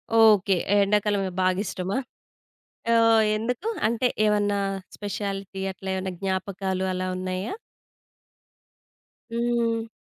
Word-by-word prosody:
Okay. 210 -4 +6 0.2
ఎ - - +5
ఎండాకాలమే 205 -1 +1
బాగిష్టమా? 185 +2 0 1.0
ఆహ్, 225 -1 +5
ఎందుకు? 250 - -2 0.2
అంటే 235 +2 +1 0.2
ఏవన్నా 205 -1 +2 0.4
స్పెషాలిటీ 200 -1 -4
అట్లా 190 +1 -9
ఏవన్నా 190 0 -3
జ్ఞాపకాలు 190 0 -2
అలా 185 0 -2
ఉన్నయా? 185 +2 -3 1.8
హ్మ్. 235 -1 0
200 Hz, 90 wpm, -25 LUFS, 190-225 Hz, 1.8 s, Okay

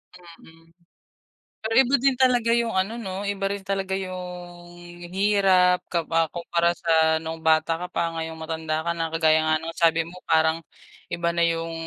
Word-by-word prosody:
Mm, 165 -1 -17 0.9
pero 220 +1 -2
iba 265 +3 -1
din 270 -1 +2
talaga 245 -3 +3
yung 235 -1 +1
ano, 195 +5 0
'no, 195 -3 -5
iba 195 -1 -2
rin 200 -1 -4
talaga 195 -1 -2
yung 180 -2 -7 0.4
hirap 190 -3 +3
kapa 165 -1 +1
kumpara 170 0 0
sa 160 -2 +2
noong 160 0 -6
bata 160 +1 +3
ka - - -3
pa, 170 0 -1
ngayong 160 0 -5
matanda 160 -1 -3
ka 170 - +1
na, 165 -1 -3
kagaya 160 -1 +3
nga 155 0 +3
ng 165 0 -6
sabi 165 0 +3
mo, 180 +2 -11
parang 160 0 +2 0.5
iba 170 0 -1
na 170 - +1
yung 165 0 -2
170 Hz, 165 wpm, -24 LUFS, 165-190 Hz, 0.9 s, talaga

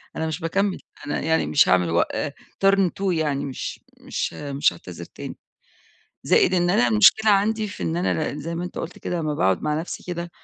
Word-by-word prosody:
أنا 160 - -2
مش 160 0 -3
باكمل، 195 +3 0 0.3
أنا 145 - -1
يعني 160 +1 +1
مش 145 - +4
هاعمل 90 -2 +3
وق 85 +1 +3
آآ 145 - -2 0.3
Turn 195 0 +5 0.2
two 195 -1 +1
يعني، 150 -4 0
مش 135 -2 -5 0.2
مش - - -3
مش 145 +1 0
هاعتذر 85 -1 -10
تاني، - - -9 0.9
زائد 185 - +4
إن 175 -1 +2
أنا 120 -8 +3
المشكلة 210 - +5
عندي 210 +2 +2
في 205 - -8
إن 160 - -1
أنا 170 -3 0
ن 145 - -6
زي 165 +3 -4
ما 170 +1 -3
أنت 180 - -7
قُلت 170 - -6
كده 175 - -3
لمّا 155 -2 -1
باقعُد 95 -8 +1
مع 150 +1 0
نفسي 170 - -6
كده، 175 -1 -5
160 Hz, 205 wpm, -23 LUFS, 140-180 Hz, 0.9 s, Turn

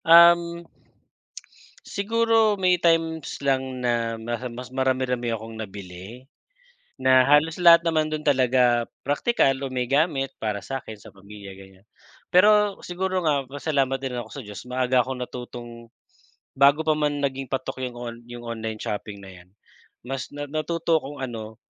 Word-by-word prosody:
Uhm, 170 0 +6 1.2
siguro 225 +1 +2
may 180 -1 +3
times 165 -2 +1
lang 130 -1 0
na 115 -1 0
mas 120 +1 -4
mas 125 +1 -8
marami-rami 130 -2 0
akong 115 0 -6
nabili. 100 +3 -9 0.8
Na 130 0 +6
halos 150 +3 +4
lahat 170 -1 +8
naman 155 -2 +1
dun 155 0 -4
talaga 125 -3 +3 0.2
praktikal 145 - +2
o - - -4
may 125 -1 -1
gamit 140 -2 +1
para 105 -2 -2
sa'kin, 115 0 -6
sa - - -14
pamilya 100 0 -12
ganyan. 95 0 -16 0.5
Pero 210 +2 +5
siguro 185 +1 -2
nga 145 -3 +1
pasalamat 140 -2 0
din 130 -2 -4
ako 120 -2 -6
sa 140 - -6
Diyos 105 -1 -8
maaga 125 0 +2
akong 130 -1 -5
natutong 120 -1 -9 0.7
bago 140 +3 +5
pa 155 - +2
man 145 -1 0
naging 135 -1 -2
patok 130 0 -3
'yung 125 -1 -4
on 120 -1 -6
'yung 120 0 -9
online 110 -1 -5
shopping 105 0 -5
na 95 - -11
'yan, 90 0 -16 0.6
mas 135 +1 -4
na 145 - -4
natuto 160 +2 0
akong 145 +1 -9
ano 110 -3 -6
130 Hz, 150 wpm, -24 LUFS, 120-155 Hz, 1.2 s, lahat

